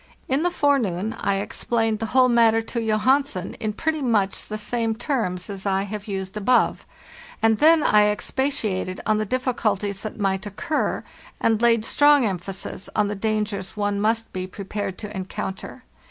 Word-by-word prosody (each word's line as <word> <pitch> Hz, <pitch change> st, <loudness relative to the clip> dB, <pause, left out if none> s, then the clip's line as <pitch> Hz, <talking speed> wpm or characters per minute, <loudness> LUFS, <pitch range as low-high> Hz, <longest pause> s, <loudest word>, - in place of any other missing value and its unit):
In 270 Hz, +3 st, +1 dB
the 355 Hz, -, +2 dB
forenoon 225 Hz, -, +1 dB
I 200 Hz, -, +1 dB
explained 225 Hz, +2 st, -1 dB
the 225 Hz, -, -2 dB
whole 255 Hz, +2 st, +4 dB
mat 230 Hz, -2 st, +4 dB
ter 225 Hz, -, +2 dB
to 235 Hz, +1 st, -4 dB
Johansen 220 Hz, -2 st, +1 dB
in 215 Hz, -, -1 dB
pretty 315 Hz, +5 st, -1 dB
much 215 Hz, -7 st, 0 dB
the 215 Hz, -, -4 dB
same 225 Hz, +1 st, -1 dB
terms 220 Hz, -, -2 dB
as 200 Hz, -1 st, -5 dB
I 195 Hz, 0 st, +1 dB
have 210 Hz, +1 st, -6 dB
used 190 Hz, -1 st, -4 dB
above; 215 Hz, +4 st, +2 dB, 0.5 s
and 225 Hz, -1 st, +3 dB
then 315 Hz, 0 st, +6 dB
I 210 Hz, 0 st, +5 dB
expatiated 210 Hz, -5 st, -1 dB
on 215 Hz, -1 st, +2 dB
the 215 Hz, -, -2 dB
difficulties 215 Hz, -5 st, -1 dB
that 215 Hz, +1 st, -6 dB
might 195 Hz, 0 st, 0 dB
occur, 300 Hz, -, -2 dB, 0.4 s
and 225 Hz, -1 st, +2 dB
laid 230 Hz, -2 st, +3 dB
strong 290 Hz, -1 st, +5 dB
emphasis 190 Hz, -1 st, -5 dB
on 210 Hz, -1 st, +2 dB
the 205 Hz, -, -3 dB
dangers 210 Hz, -1 st, -2 dB
one 205 Hz, -1 st, 0 dB
must 225 Hz, +1 st, 0 dB
be 185 Hz, 0 st, -3 dB
prepared 200 Hz, 0 st, -5 dB
to 210 Hz, -1 st, -7 dB
encounter. 190 Hz, +5 st, -6 dB
215 Hz, 170 wpm, -23 LUFS, 195-240 Hz, 0.5 s, then